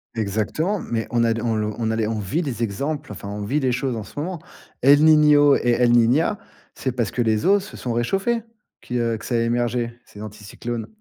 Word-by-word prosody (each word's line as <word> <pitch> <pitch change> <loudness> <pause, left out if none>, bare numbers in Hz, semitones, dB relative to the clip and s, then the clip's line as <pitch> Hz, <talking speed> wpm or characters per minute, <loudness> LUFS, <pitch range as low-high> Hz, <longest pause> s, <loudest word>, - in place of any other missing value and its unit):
Exactement, 110 - -1
mais 115 -8 -3
on 120 -1 +2
a 115 - +3
d 115 - -4
on 115 -1 0
l 105 0 -1
on 115 -1 -1
a 110 - 0
les, 110 -1 0
on 110 0 -2
vit 105 - -1
des 130 -7 -3
exemples, 140 +8 -3
enfin 100 - -8
on 105 0 -5
vit 145 +8 0
les 130 -2 +1
choses 125 0 -1
en 110 - -4
ce 125 - -9
moment. 175 +3 -4 0.4
El 145 +4 +6
Niño 150 -2 +6
et 120 - 0
El 120 -1 +4
Niña, 125 - +3 0.4
c'est 130 - -2
parce 120 -4 -2
que 125 - -1
les 110 -2 +1
eaux 200 +2 +4
se 200 - -10
sont 120 - -3
réchauffées 195 - 0 0.4
qui, 125 - -4
heu, 115 -1 0
que - - -11
ça 120 - -2
a - - +3
émergé 120 0 -1
ces 105 - -13
anticyclones. 110 +2 -6
120 Hz, 235 wpm, -22 LUFS, 110-145 Hz, 0.4 s, El